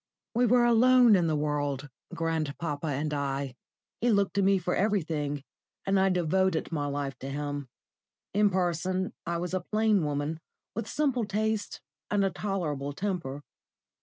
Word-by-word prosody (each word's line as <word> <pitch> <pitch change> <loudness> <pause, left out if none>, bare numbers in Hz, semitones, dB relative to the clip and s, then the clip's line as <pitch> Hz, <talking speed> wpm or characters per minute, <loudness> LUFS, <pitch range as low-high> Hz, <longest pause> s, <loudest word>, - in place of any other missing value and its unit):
We 245 +1 +3
were 240 +1 +5
alone 240 -1 +6
in 175 -3 +2
the 155 - +1
world, 145 -2 -1 0.3
grandpapa 160 -1 -2
and 150 +1 -1
I. 140 -2 -2 0.5
He 245 - +2
looked 200 -3 +2
to 200 - +2
me 195 0 +4
for 180 0 -1
everything, 155 -8 0 0.4
and 195 0 +3
I 190 0 +4
devoted 180 0 +1
my 145 -3 -1
life 140 -1 -3
to 135 - -6
him. 145 -1 -4 0.6
In 205 +1 +4
person 185 0 0
I 170 0 0
was 175 +1 -4
a 185 - 0
plain 215 0 +2
woman, 145 +2 -2 0.3
with 225 +1 -4
simple 270 -6 +1
tastes 215 +1 -1 0.3
and 205 -1 +2
a 195 - +1
tolerable 160 -8 -2
temper. 165 -6 -3
175 Hz, 155 wpm, -29 LUFS, 145-200 Hz, 0.6 s, alone